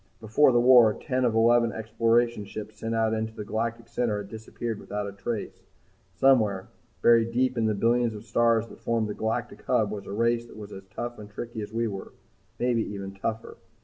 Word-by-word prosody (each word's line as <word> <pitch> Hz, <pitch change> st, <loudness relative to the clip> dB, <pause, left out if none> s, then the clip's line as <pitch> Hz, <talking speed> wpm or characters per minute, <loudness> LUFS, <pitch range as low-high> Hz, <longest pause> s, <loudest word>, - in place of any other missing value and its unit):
Before 110 Hz, +6 st, +4 dB
the 120 Hz, -, +4 dB
War, 120 Hz, -3 st, +7 dB
ten 130 Hz, -2 st, -1 dB
of 115 Hz, -2 st, +1 dB
eleven 115 Hz, +1 st, +4 dB
exploration 115 Hz, 0 st, +1 dB
ships 105 Hz, +1 st, -8 dB
sent 115 Hz, 0 st, -2 dB
into 110 Hz, 0 st, 0 dB
the 105 Hz, -, -6 dB
galactic 115 Hz, +2 st, -3 dB
center 115 Hz, -3 st, -1 dB
had 100 Hz, -1 st, -6 dB
disappeared 110 Hz, 0 st, -5 dB
without 105 Hz, 0 st, -4 dB
a -, -, -5 dB
trace. 100 Hz, +2 st, -5 dB, 0.5 s
Somewhere, 110 Hz, -8 st, +3 dB, 0.3 s
buried 115 Hz, -1 st, +5 dB
deep 130 Hz, +2 st, +1 dB
in 115 Hz, -2 st, +1 dB
the 110 Hz, -, +1 dB
billions 115 Hz, +2 st, +2 dB
of 105 Hz, +1 st, -9 dB
stars 115 Hz, 0 st, +2 dB
that -, -, -14 dB
formed 115 Hz, -2 st, 0 dB
the -, -, -2 dB
galactic 110 Hz, +1 st, -3 dB
hub, 105 Hz, -2 st, +2 dB
was 100 Hz, -2 st, -6 dB
a -, -, -6 dB
race 115 Hz, +2 st, +1 dB
that -, -, -14 dB
was 105 Hz, -1 st, -9 dB
as 95 Hz, 0 st, -9 dB
tough 120 Hz, +4 st, -6 dB
and 105 Hz, -1 st, -10 dB
tricky 115 Hz, +1 st, -6 dB
as 105 Hz, -, -7 dB
we 115 Hz, +1 st, 0 dB
were 100 Hz, -3 st, -7 dB, 0.4 s
maybe 120 Hz, -2 st, +1 dB
even 100 Hz, -1 st, -6 dB
tougher. 110 Hz, +3 st, -4 dB
115 Hz, 200 wpm, -27 LUFS, 105-120 Hz, 0.5 s, War